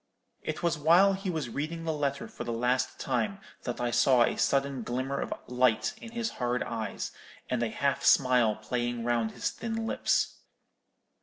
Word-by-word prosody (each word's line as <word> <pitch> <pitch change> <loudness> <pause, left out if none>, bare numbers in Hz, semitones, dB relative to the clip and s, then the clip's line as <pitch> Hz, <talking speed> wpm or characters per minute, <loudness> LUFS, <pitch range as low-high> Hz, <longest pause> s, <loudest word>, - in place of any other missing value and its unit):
It 155 +2 -4
was 170 -3 +1
while 175 +6 +6
he 195 0 -3
was 155 -8 -2
reading 155 +6 -3
the 160 -1 -1
letter 140 -2 -2
for - - -7
the 120 - -3
last 125 +2 0
time 195 +10 -1 0.3
that 120 - -3
I 120 0 0
saw 125 0 +5
a - - +1
sudden 140 -2 +1
glimmer 130 +4 -2
of - - -3
light 125 -2 +2
in 230 - -9
his 235 -1 -2
hard 125 0 +1
eyes, 110 -4 -4 0.4
and 125 -2 +1
a 120 - +1
half 140 +4 0
smile 125 -5 +5
playing 120 +2 -2
round 115 -2 0
his - - -2
thin 225 -1 -4
lips. - - 0
130 Hz, 175 wpm, -29 LUFS, 120-160 Hz, 0.4 s, while